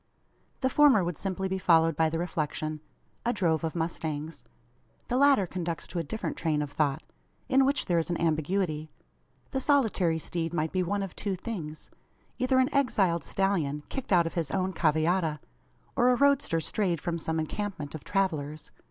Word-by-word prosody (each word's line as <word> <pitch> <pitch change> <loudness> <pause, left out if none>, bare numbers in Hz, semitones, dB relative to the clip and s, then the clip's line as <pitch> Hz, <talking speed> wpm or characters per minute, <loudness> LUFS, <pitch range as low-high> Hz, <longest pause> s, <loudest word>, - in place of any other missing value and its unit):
The 260 - +2
former 285 -10 +6
would 175 -3 -3
simply 190 0 -2
be 190 0 -2
followed 165 -3 +4
by 160 +1 +3
the 165 - -2
reflection: 155 -2 -2 0.4
"A 235 - +1
drove 170 -8 +1
of 160 0 -2
mustangs." 160 -2 -3 0.7
The 245 - 0
latter 275 -6 +5
conducts 170 -2 -4
to 175 - -3
a - - -1
different 215 +9 -4
train 150 -3 0
of 145 - -6
thought, 145 -2 0 0.4
in 270 0 +4
which 280 +2 +1
there 175 -2 +2
is 165 - -2
an 175 - -1
ambiguity. 155 0 0 0.6
The 265 - -1
solitary 220 - +2
steed 165 +1 -3
might 155 -1 0
be 185 - 0
one 200 +3 -1
of 195 - -7
two 200 -2 -2
things: 170 -7 -6 0.5
either 255 +1 +2
an 260 +3 +3
exiled 195 - +2
stallion, 160 -8 0
kicked 270 -5 -5
out 175 -3 +5
of 165 - -3
his 165 -4 -1
own 190 -1 -1
cavallada, 160 0 +1 0.6
or 245 +1 +4
a 250 - +5
roadster 280 -10 +3
strayed 175 0 -1
from 170 +1 -3
some 160 0 -2
encampment 160 -2 -4
of 155 - -7
travellers. 155 -6 -2
170 Hz, 180 wpm, -28 LUFS, 155-200 Hz, 0.7 s, former